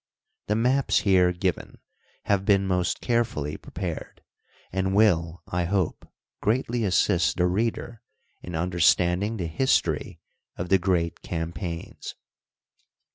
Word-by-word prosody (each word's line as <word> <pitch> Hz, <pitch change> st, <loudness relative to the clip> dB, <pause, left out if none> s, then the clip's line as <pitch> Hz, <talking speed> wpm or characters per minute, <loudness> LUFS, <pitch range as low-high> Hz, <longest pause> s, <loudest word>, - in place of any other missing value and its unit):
The 105 Hz, -, +1 dB
maps 125 Hz, +4 st, +2 dB
here 90 Hz, -3 st, +4 dB
given 90 Hz, 0 st, -3 dB, 0.5 s
have 100 Hz, -2 st, +1 dB
been 100 Hz, -1 st, +3 dB
most 90 Hz, -2 st, 0 dB
carefully 115 Hz, -, -1 dB
prepared, -, -, -6 dB, 0.5 s
and 95 Hz, +1 st, -1 dB
will, 85 Hz, -5 st, +2 dB
I 90 Hz, 0 st, -1 dB
hope, 95 Hz, -1 st, -2 dB, 0.3 s
greatly 120 Hz, +1 st, 0 dB
assist 90 Hz, -3 st, +2 dB
the 90 Hz, -, +3 dB
reader 110 Hz, +4 st, -2 dB, 0.4 s
in 90 Hz, -, -7 dB
understanding 90 Hz, +4 st, +2 dB
the 90 Hz, -, -3 dB
history 130 Hz, +12 st, 0 dB, 0.4 s
of 85 Hz, 0 st, -4 dB
the 95 Hz, 0 st, +5 dB
great 90 Hz, -2 st, 0 dB
campaigns. 85 Hz, 0 st, -5 dB
95 Hz, 115 wpm, -25 LUFS, 85-105 Hz, 0.5 s, the